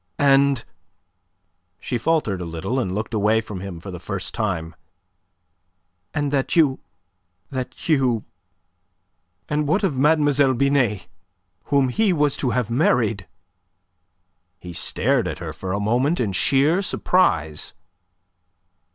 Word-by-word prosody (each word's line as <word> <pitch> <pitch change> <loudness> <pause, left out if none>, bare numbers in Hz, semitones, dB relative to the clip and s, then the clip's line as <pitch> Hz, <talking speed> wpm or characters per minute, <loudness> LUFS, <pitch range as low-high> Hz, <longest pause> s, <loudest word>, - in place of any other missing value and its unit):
"And..." 140 -2 +3 1.1
She 120 - -3
faltered 120 - 0
a - - -4
little, 85 +10 -3
and 95 -7 -2
looked 110 +2 -4
away 110 +1 +2
from 105 -3 -6
him 95 -3 -7
for 95 +3 -8
the 90 - -7
first 95 +1 -5
time. 90 -8 -2 1.4
"And 145 -1 -1
that 135 -2 0
you... 150 -6 +3 0.7
that 130 -2 -6
you... 130 -8 +2 1.2
And 150 0 -1
what 190 +8 +1
of 180 -8 +1
Mademoiselle 145 -1 +3
Binet, 130 -6 +1 0.6
whom 140 -2 +2
he 205 - +2
was 150 -3 +1
to 130 - -1
have 120 -2 -1
married?" 115 - +1 1.3
He 90 -1 -9
stared - - +1
at - - -4
her - - -6
for 95 - -6
a 100 - -1
moment 125 +10 +1
in 110 -5 0
sheer 140 - +2
surprise. 80 - 0
125 Hz, 125 wpm, -22 LUFS, 100-145 Hz, 1.4 s, And